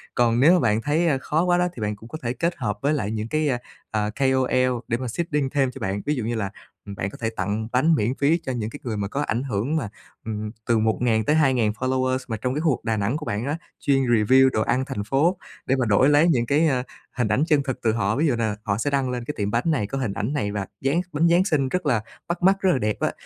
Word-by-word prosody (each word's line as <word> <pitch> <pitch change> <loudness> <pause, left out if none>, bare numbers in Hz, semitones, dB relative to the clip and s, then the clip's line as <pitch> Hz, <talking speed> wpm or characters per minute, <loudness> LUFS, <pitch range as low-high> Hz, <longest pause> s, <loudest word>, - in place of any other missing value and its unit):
Còn 120 -1 +3
nếu 155 +7 +6
mà 180 - +4
bạn 110 -5 +1
thấy, 155 +6 +1
ơ, 145 -4 +2
khó 155 +4 0
quá 175 -1 +3
đó, 180 0 +2
thì 115 - -7
bạn 105 0 -1
cũng 110 +3 -14
có 155 - -6
thể 120 0 -2
kết 170 +6 -1
hợp 105 -6 -2
với 145 +2 +2
lại 110 -9 -1
những 110 0 -3
cái, 155 +3 0 0.4
ờ, 105 -1 0
KOL 130 0 +1
để 115 - 0
mà 130 +1 -4
seeding 150 +1 -1
thêm 135 -2 +1
cho - - -10
bạn. 95 +1 -2
Ví 150 - +1
dụ 125 - -3
như 115 +2 -2
là, 100 -3 -2 0.3
ừm, 100 -1 -7
bạn 95 - -3
có - - -11
thể 115 - 0
tặng 105 +1 -3
bánh 150 +7 +3
miễn 120 -1 0
phí 150 +5 +2
cho 130 - -2
những 115 -4 -3
cái 145 - -9
người 115 -5 -3
mà 100 -1 -2
có 140 +8 -3
ảnh 120 -3 -1
hưởng 125 +3 -1
mà, 135 -10 -1 0.4
ừ, 110 - -3 0.4
từ 115 - +3
1000-2000 120 +2 +2
followers 130 +3 0
mà 110 -3 -3
trong 125 +4 -2
cái 150 - -2
khu 165 - +2
vực 125 - -4
Đà 110 -1 0
Nẵng 105 +7 0
của 155 - -7
bạn 105 0 -2
á, 145 +3 -2 0.2
chuyên 135 -1 +2
review 125 +2 +4
đồ 110 - -1
ăn 130 +4 0
thành 130 -7 -4
phố 145 - +1 0.3
để 135 - +2
mà 130 -2 0
đổi 110 +6 +4
lấy 150 +3 +5
những 125 -8 +2
cái, 150 +6 +3
ơ, 130 -4 +1 0.3
hình 120 -3 +1
ảnh 135 - +2
chân 150 -4 +3
thực 130 -2 -4
từ 115 - +2
họ. 110 -2 0
Ví 155 +4 +2
dụ 130 - +2
là 110 -3 -1
họ 100 -2 -1
sẽ 115 +6 -1
đăng 135 -2 0
lên 125 -1 -3
cái 150 - -3
tiệm 105 -1 -1
bánh 115 +2 +1
này, 150 -11 +1
có 135 - -4
hình 125 -7 -2
ảnh 105 +7 -2
này 115 -9 -1
và 100 -1 -3 0.2
Giáng 140 +6 +1
bánh 155 +3 +3
Giáng 175 +2 +4
Sinh 145 -9 +1
rất 180 +3 -2
là 120 -7 +2 0.3
bắt 170 +1 -3
mắt, 195 +1 +5
rất 190 - +3
là 165 - +2
đẹp 105 -2 0
á, - - 0
130 Hz, 285 wpm, -24 LUFS, 110-145 Hz, 0.4 s, nếu